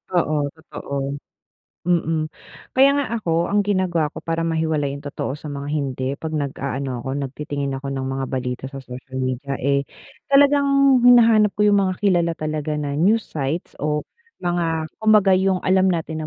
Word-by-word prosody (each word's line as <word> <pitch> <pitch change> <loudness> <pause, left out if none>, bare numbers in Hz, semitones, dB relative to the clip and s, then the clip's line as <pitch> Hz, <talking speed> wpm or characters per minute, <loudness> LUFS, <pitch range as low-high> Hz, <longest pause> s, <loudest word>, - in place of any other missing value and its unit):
Oo 165 -3 +2 0.2
totoo. 160 -3 -9 0.9
Mm. 165 -3 +1 0.5
kaya 270 +2 +7
nga 285 - 0
ako, 170 -5 0
ang 205 0 +2
ginagawa 180 -6 0
ko - - -8
para 165 0 -2
mahiwalay 160 -3 0
yung 140 - -6
totoo 140 0 -4
sa - - -8
mga 140 -1 -5
hindi 135 -3 -2
pag 160 -1 -4
nagaano 135 -2 -3
ako, 130 - -6
nagtitingin 140 0 -4
ako 140 - -7
ng 135 - -3
mga 135 0 -2
balita 125 -1 -3
sa 135 -1 -9
social 130 +1 -10
media 130 +2 -3
eh, 140 +1 0 0.4
talagang 280 +1 +5 0.3
hinahanap 230 -3 +6
ko 210 - +1
yung 200 - +4
mga 185 -2 0
kilala 175 -4 +3
talaga 155 -1 -3
na 145 -1 -3
news 195 +10 +2
sites 150 +3 -3
o 150 +1 -1 0.4
mga 170 -2 0 0.2
kumbaga 215 -3 +5
yung 185 0 +2
alam 190 0 +3
natin 160 -3 -1
160 Hz, 160 wpm, -21 LUFS, 140-185 Hz, 0.9 s, kaya